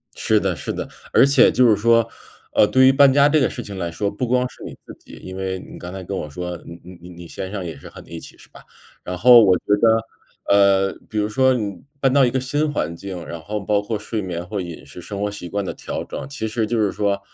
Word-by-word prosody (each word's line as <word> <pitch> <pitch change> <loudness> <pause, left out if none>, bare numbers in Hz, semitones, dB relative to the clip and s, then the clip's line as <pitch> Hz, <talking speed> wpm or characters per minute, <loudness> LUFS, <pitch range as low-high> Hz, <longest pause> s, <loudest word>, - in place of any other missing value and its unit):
是 - - +2
的 - - -1
是 - - -4
的。 - - -5 0.2
而 - - +6
且 140 -2 +5
就 125 0 +4
是 110 - +4
说， 115 +2 +3 0.5
呃， - - +5
对 130 +4 +4
于 130 - +7
搬 135 -1 +6
家 140 +1 +5
这 155 +1 +3
个 130 - +2
事 120 - -6
情 100 -2 -8
来 85 -2 -3
说， 100 +4 -2
不 125 +5 -3
光 125 +1 +1
是 - - -16
你 - - -8
自 - - -11
己， - - -18
因 95 0 -8
为 95 -1 -3
你 - - -11
刚 90 +1 -8
才 95 0 -7
跟 95 +2 -5
我 75 - -4
说 90 +3 -5
你 85 0 -11 0.2
你 90 - -11
你 85 -1 -11
先 95 - -6
生 100 -3 -4
也 80 -3 -6
是 70 - -12
和 - - -12
你 - - -17
一 85 -1 -7
起， - - -13
是 - - -17
吧？ - - -16 0.4
然 90 - -5
后 120 +4 +8
我 95 -2 +4
觉 - - -27 0.2
得， 115 0 +3 0.5
呃， 95 -1 +4 0.2
比 110 - -4
如 105 0 0
说 130 +4 +3
你 100 -7 -4 0.2
搬 135 -2 +2
到 140 -1 +5
一 120 - +2
个 130 - -1
新 145 +4 -1
环 85 - -2
境， 90 -2 -7
然 85 - -7
后 105 +6 -4
包 100 +1 0
括 105 0 -3
睡 105 0 -4
眠 90 -1 -5
或 100 -1 -4
饮 85 -6 -8
食、 75 +5 -11
生 100 +3 -7
活 105 - -1
习 100 -4 -8
惯 100 +1 -3
的 - - -5
调 - - -5
整， 135 - -7
其 125 -6 -4
实 110 0 -1
就 115 +1 -1
是 105 -2 +2
说， 100 -1 -1
105 Hz, 295 characters per minute, -21 LUFS, 90-120 Hz, 0.5 s, 后